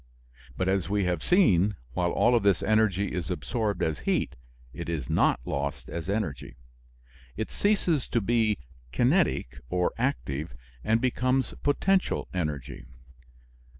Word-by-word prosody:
But, 95 Hz, -, 0 dB
as 95 Hz, -2 st, +1 dB
we 100 Hz, 0 st, +1 dB
have 90 Hz, -3 st, 0 dB
seen, 105 Hz, -, +4 dB, 0.2 s
while 90 Hz, +3 st, 0 dB
all 120 Hz, -, +3 dB
of 120 Hz, -, +4 dB
this 100 Hz, -2 st, +2 dB
energy 100 Hz, -2 st, +2 dB
is 90 Hz, -5 st, -3 dB
absorbed 110 Hz, -4 st, -2 dB
as 80 Hz, -1 st, -1 dB
heat, -, -, -1 dB, 0.4 s
it -, -, -6 dB
is 75 Hz, -7 st, -3 dB
not -, -, +3 dB
lost 70 Hz, +1 st, -3 dB
as 85 Hz, +2 st, -5 dB
energy. 80 Hz, -, -3 dB, 0.8 s
It 110 Hz, -, -3 dB
ceases 185 Hz, -, +1 dB
to 120 Hz, -, +1 dB
be 110 Hz, 0 st, +2 dB, 0.3 s
kinetic 120 Hz, -, +1 dB
or 90 Hz, -1 st, +1 dB
active 75 Hz, -, -2 dB, 0.3 s
and 115 Hz, +1 st, +2 dB
becomes 130 Hz, +1 st, +1 dB
potential 185 Hz, +7 st, +1 dB
energy. 75 Hz, -8 st, -4 dB
100 Hz, 135 wpm, -27 LUFS, 85-120 Hz, 0.8 s, seen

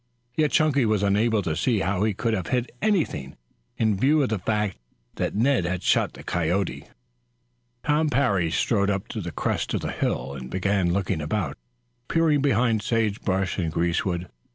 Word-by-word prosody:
Yet 155 Hz, -1 st, +2 dB
Chunky 150 Hz, -4 st, +3 dB
was 110 Hz, -3 st, +1 dB
unable 105 Hz, +2 st, +2 dB
to 80 Hz, -3 st, -1 dB
see 110 Hz, +3 st, +1 dB
how 95 Hz, 0 st, 0 dB
he 110 Hz, -2 st, +1 dB
could 115 Hz, +2 st, 0 dB
have 95 Hz, -5 st, -2 dB
hit 125 Hz, -1 st, -1 dB
anything, 155 Hz, -, 0 dB, 0.4 s
in 110 Hz, -2 st, +2 dB
view 145 Hz, +5 st, +4 dB
of 130 Hz, -, 0 dB
the 110 Hz, -2 st, -1 dB
fact 105 Hz, 0 st, -1 dB, 0.4 s
that -, -, -1 dB
Ned 125 Hz, 0 st, +3 dB
had 90 Hz, +1 st, -2 dB
shot -, -, +2 dB
the -, -, -11 dB
coyote. 85 Hz, +3 st, -1 dB, 1.0 s
Tom 150 Hz, +1 st, +2 dB
Parry 105 Hz, -, +2 dB
strode 100 Hz, +4 st, +1 dB
up 95 Hz, -1 st, -1 dB
to 110 Hz, -, -4 dB
the 85 Hz, -2 st, -5 dB
crest -, -, -1 dB
of -, -, -1 dB
the -, -, -3 dB
hill 70 Hz, -, -2 dB
and 65 Hz, -2 st, -7 dB
began 95 Hz, 0 st, +1 dB
looking 90 Hz, -4 st, -1 dB
about, 95 Hz, +7 st, -2 dB, 0.5 s
peering 160 Hz, -3 st, +2 dB
behind 120 Hz, -5 st, +2 dB
sage 110 Hz, -2 st, 0 dB
bush 95 Hz, 0 st, -1 dB
and 85 Hz, -3 st, -1 dB
greasewood. 85 Hz, +1 st, -1 dB
105 Hz, 175 wpm, -25 LUFS, 90-120 Hz, 1.0 s, view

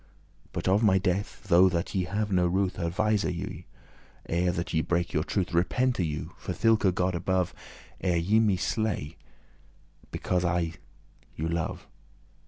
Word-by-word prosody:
But -, -, -4 dB
of 100 Hz, +3 st, +4 dB
my 100 Hz, -4 st, +5 dB
death 95 Hz, +2 st, -1 dB
though 95 Hz, 0 st, +6 dB
that 85 Hz, 0 st, -2 dB
ye 95 Hz, -3 st, 0 dB
have 105 Hz, +3 st, -2 dB
no 90 Hz, -2 st, +3 dB
ruth, 95 Hz, +1 st, 0 dB
Advise 105 Hz, +4 st, +1 dB
you, 85 Hz, -2 st, -4 dB, 0.6 s
ere 90 Hz, +2 st, +1 dB
that 85 Hz, 0 st, -4 dB
ye 80 Hz, -, +3 dB
break 85 Hz, +1 st, -1 dB
your 75 Hz, -2 st, +1 dB
truth: 90 Hz, -1 st, -2 dB
Repente 120 Hz, +6 st, +1 dB
you, 75 Hz, -3 st, -3 dB
for -, -, -4 dB
thilke 110 Hz, 0 st, +3 dB
God 90 Hz, 0 st, +1 dB
above, 90 Hz, +1 st, 0 dB, 0.5 s
Ere 90 Hz, -2 st, +1 dB
ye 100 Hz, +7 st, +3 dB
me 105 Hz, -4 st, +3 dB
slay 105 Hz, -7 st, -2 dB, 0.9 s
because 90 Hz, -1 st, -1 dB
that 90 Hz, 0 st, +1 dB
I 85 Hz, -1 st, -1 dB, 0.6 s
you 80 Hz, -, -2 dB
love. 85 Hz, 0 st, -3 dB
90 Hz, 160 wpm, -28 LUFS, 85-100 Hz, 0.9 s, though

